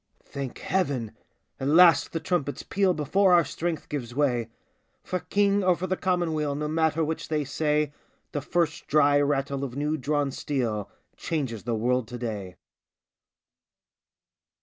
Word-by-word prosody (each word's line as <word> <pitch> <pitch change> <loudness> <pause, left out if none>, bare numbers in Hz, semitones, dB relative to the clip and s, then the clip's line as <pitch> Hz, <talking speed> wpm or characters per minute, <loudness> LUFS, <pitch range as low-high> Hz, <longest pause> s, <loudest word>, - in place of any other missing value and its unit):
Thank 140 -3 -6
Heaven! 140 - -1 0.5
At 135 - -2
last 170 +3 +6
the 165 - -2
trumpets 160 -4 -2
peal 195 -2 +1
Before 180 +5 +3
our 170 -3 +4
strength 165 +3 -3
gives 125 -5 -5
way. 125 -6 +1 0.5
For 185 - -2
King 200 +1 +1
or 180 -1 +4
for 180 - -4
the 185 0 0
Commonweal 160 -6 0
No 150 +1 -2
matter 160 0 +1
which 160 +1 -3
they 155 -2 0
say, 150 +1 0 0.4
The 145 - -2
first 160 +1 -1
dry 145 -1 +4
rattle 140 -1 0
of 130 -3 -5
new 150 +2 -1
drawn 145 +1 0
steel 115 -8 -2 0.3
Changes 130 -10 -3
the 120 -1 0
world 125 +1 0
to 120 - -7
day 105 -6 -5
150 Hz, 150 wpm, -26 LUFS, 130-165 Hz, 0.5 s, last